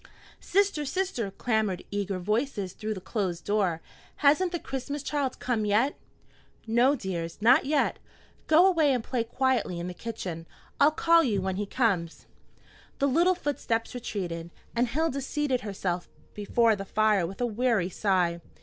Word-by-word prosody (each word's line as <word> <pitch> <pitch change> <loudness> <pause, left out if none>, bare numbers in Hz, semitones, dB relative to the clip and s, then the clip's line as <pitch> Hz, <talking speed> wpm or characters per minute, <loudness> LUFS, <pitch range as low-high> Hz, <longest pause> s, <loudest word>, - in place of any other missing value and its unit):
"Sister, 395 -5 +1
sister!" 295 - -2
clamored 215 -2 -1
eager 200 -1 -2
voices 210 0 -1
through 215 0 -4
the - - -6
closed 180 -5 -3
door, 195 -6 +1 0.3
"hasn't 305 +5 +3
the 345 - -1
Christ 280 0 -5
child 285 -3 -1
come 235 -4 -1
yet?" 215 +7 +2 0.7
"No, 240 +5 +3
dears, 175 - -5
not 245 +8 +5
yet. 295 -1 +1 0.5
Go 320 +4 +6
away 320 -7 +4
and 245 -3 -1
play 245 -1 -1
quietly 240 -6 0
in 170 - -4
the 180 - -5
kitchen. 180 -6 -6 0.3
I'll 285 - +7
call 335 +2 +4
you 215 -8 +1
when 190 0 -2
he 205 0 -2
comes." 195 -9 0 0.7
The 280 - +1
little 340 +7 +3
footsteps 250 -8 -2
retreated, 180 -9 -4 0.3
and 240 +1 +2
Hilda 280 +1 -1
seated 275 -2 -1
herself 185 -4 -3 0.2
before 220 +2 +2
the 195 - -5
fire 210 -3 +2
with 195 +2 -9
a 245 - +1
weary 230 -5 +1
sigh. 180 -4 +1
225 Hz, 155 wpm, -28 LUFS, 195-280 Hz, 0.7 s, I'll